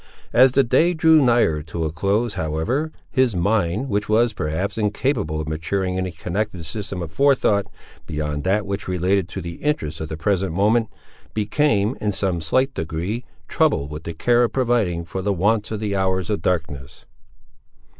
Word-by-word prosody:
As 130 +1 +6
the 135 - +5
day 170 +8 +3
drew 160 -1 +5
nigher 120 - +3
to 80 +1 -3
a 80 - -2
close, 100 +7 0
however, 90 - -1 0.2
his 130 -5 +2
mind, 100 +5 +1
which 105 -3 -1
was, 115 +1 +3
perhaps, 85 +2 -2
incapable 105 - -1
of 80 - -4
maturing 90 +4 -2
any 95 0 -1
connected 90 +1 -3
system 100 0 -5
of 80 - -7
forethought, 130 -7 +2 0.4
beyond 75 -1 -3
that 100 +4 +1
which 100 0 -4
related 90 0 +1
to 95 - -5
the 85 -1 -7
interests 80 - -2
of 80 - -4
the 80 - -5
present 95 +1 0
moment, 110 +4 +3 0.5
became, 110 0 +1
in 105 - 0
some 95 -3 -1
slight 130 - +1
degree, 85 +8 -3 0.2
troubled 70 +1 +1
with 75 +1 -7
the 85 - -5
care 120 +8 +3
of 120 - +1
providing 115 -10 +1
for 95 +2 -4
the 100 +2 0
wants 105 +4 +1
of 110 - -3
the 105 -2 -2
hours 95 0 0
of 105 - -1
darkness. 75 -6 -3
100 Hz, 175 wpm, -22 LUFS, 85-115 Hz, 0.5 s, As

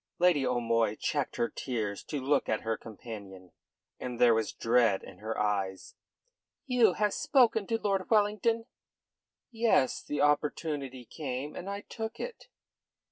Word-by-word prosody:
Lady 175 -5 +4
O'Moy 115 -3 +1
checked - - -2
her 120 - +1
tears 110 -7 -3
to 145 - -4
look 135 +3 +1
at 110 - 0
her 115 0 -1
companion, 100 -5 -10 0.5
and 125 -1 -5
there 120 -1 +6
was 110 -1 0
dread 115 -4 +2
in 90 - -12
her 110 +2 -4
eyes. 100 -2 -1 0.7
"You 245 -7 +4
have 210 +1 +1
spoken 230 -6 +3
to 225 - +1
Lord 195 -3 -1
Wellington?" 220 +1 +2 0.9
"Yes. 225 - +2
The 145 - -4
opportunity 145 -3 0
came, 135 +2 -5
and 185 - -6
I 200 0 -4
took 225 +2 -6
it." - - -6
135 Hz, 140 wpm, -30 LUFS, -, 0.9 s, there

